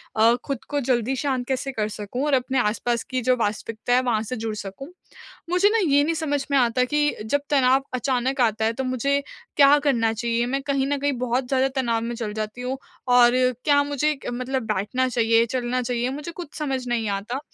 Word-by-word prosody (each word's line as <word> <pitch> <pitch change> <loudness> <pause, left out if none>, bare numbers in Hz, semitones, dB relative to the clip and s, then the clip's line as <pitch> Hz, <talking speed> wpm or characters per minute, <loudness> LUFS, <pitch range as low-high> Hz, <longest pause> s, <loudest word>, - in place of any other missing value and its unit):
अ, 225 +2 +5
खुद 275 -3 -4
को 290 - 0
जल्दी 250 0 0
शांत 260 -2 -2
कैसे 270 +1 -2
कर 215 -4 -2
सकूँ 215 +6 -4
और 295 - 0
अपने 260 0 +1
आसपास 235 +1 0
की 255 0 0
जो 255 - +5
वास्तविकता 220 +2 -2
है, 250 - +5
वहाँ 230 -4 0
से 225 +3 -4
जुड़ 220 -1 -3
सकूँ। 205 +8 -8 0.6
मुझे 360 +3 +4
ना, 455 - +2
ये 285 0 +4
नहीं 325 +3 0
समझ 290 -3 -1
में 280 - +4
आता 250 0 +3
कि 295 +3 +1 0.2
जब 285 +6 +1
तनाव 270 -1 +3
अचानक 255 +1 0
आता 220 -2 +2
है, 225 - +1
तो 265 +3 -3
मुझे 260 +3 0 0.4
क्या 280 0 +7
करना 230 -5 +2
चाहिए? 235 +1 -1
मैं 270 +3 -1
कहीं 275 -1 0
न 285 0 0
कहीं 285 +1 0
बहुत 250 +1 -1
ज़्यादा 265 0 +2
तनाव 230 -2 0
में 235 +1 -3
चल 220 -3 -4
जाती 215 +2 -5
हूँ 255 +2 -3 0.4
और 240 -1 +7 0.3
क्या 285 -1 +4
मुझे 290 +1 0
क - - -2 0.2
मतलब 265 -1 -1
बैठना 230 +7 0
चाहिए, 230 -1 +3
चलना 250 +1 -1
चाहिए, 245 0 -1
मुझे 295 +4 -6
कुछ 340 -4 -9
समझ 265 -4 -2
नहीं 230 -2 0
आता 205 +6 -3
255 Hz, 210 wpm, -23 LUFS, 230-275 Hz, 0.6 s, क्या